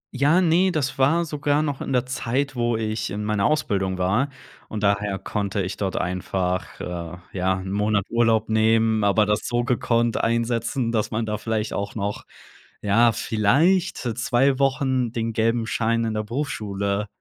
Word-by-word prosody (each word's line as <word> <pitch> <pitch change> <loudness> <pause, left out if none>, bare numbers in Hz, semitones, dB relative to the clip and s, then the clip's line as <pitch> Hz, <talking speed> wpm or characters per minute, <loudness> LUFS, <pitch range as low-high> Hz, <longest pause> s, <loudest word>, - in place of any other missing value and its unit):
Ja, 145 +7 +4
ne, 180 +2 +3
das 140 -4 -2
war 160 +6 +3
sogar 150 -1 0
noch 145 -3 -3
in - - -4
der 125 -1 +2
Zeit, 130 +2 -2
wo 120 -1 0
ich 110 0 -2
in 105 +2 -4
meiner 105 -2 +1
Ausbildung 100 -12 0
war, 105 +10 +1 0.4
und 105 -1 -5
daher 100 -1 +1
konnte 100 0 -2
ich 95 - -4
dort 95 -2 -2
einfach, 90 0 -2
äh, 85 0 -5 0.2
ja, 95 0 +1
'n 95 0 -6
Monat 105 0 +1
Urlaub 115 -2 +2
nehmen, 110 0 +2
aber 100 +1 +3
das 105 0 0
so 120 0 0
gekonnt 120 -2 +1
einsetzen, 115 +1 0
dass 110 -3 0
man 110 0 -2
da 105 -1 -3
vielleicht 110 -1 -2
auch 100 0 -4
noch, 100 -1 -3 0.6
ja, 115 +3 +4
vielleicht 140 - +2 0.2
2 130 +3 +2
Wochen 130 -3 +1
den 115 -1 -2
gelben 115 +1 +1
Schein 115 0 0
in 110 - -2
der 105 - -1
Berufsschule 105 -5 -2
115 Hz, 165 wpm, -23 LUFS, 100-125 Hz, 0.6 s, Ja